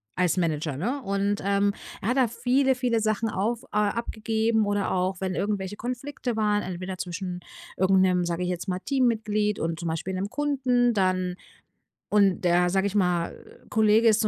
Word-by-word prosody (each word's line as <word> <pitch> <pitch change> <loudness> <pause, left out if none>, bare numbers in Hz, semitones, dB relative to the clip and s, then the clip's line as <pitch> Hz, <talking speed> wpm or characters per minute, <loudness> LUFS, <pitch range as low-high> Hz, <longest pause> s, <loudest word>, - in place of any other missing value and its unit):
als 180 -2 +2
Manager, 155 -4 -1
ne? 240 - -1
Und, 200 +1 0
ähm, 200 0 +2 0.3
er 205 - -1
hat 250 - +1
da 255 -2 +4
viele, 260 +4 +2
viele 245 -2 +1
Sachen 215 +1 0
auf 220 +4 -1
äh, - - -23
abgegeben 220 0 0
oder 205 -1 0
auch 185 +1 -1
wenn 185 -1 -2
irgendwelche 200 -1 -2
Konflikte 250 +1 -4
waren, 210 -1 +1
entweder 185 +1 -5
zwischen 180 0 -4 0.4
irgend 190 0 +4
'nem, 180 -1 +3
sage 170 0 -2
ich 180 - -1
jetzt 180 +2 -3
mal, 185 -1 -1
Teammitglied 215 -4 0
und 165 0 -2
zum 170 -1 -3
Beispiel 165 +4 -3
'nem 195 +2 -2
Kunden 255 -5 +1
dann. 185 -2 +1 0.7
Und 200 -3 +3
der, 175 0 +3
sage 190 +2 +1
ich 200 - -1
mal, 180 -4 +1 0.4
Kollege 220 +1 +4
ist 220 0 +4
zu 215 - +2
200 Hz, 180 wpm, -26 LUFS, 185-225 Hz, 0.7 s, da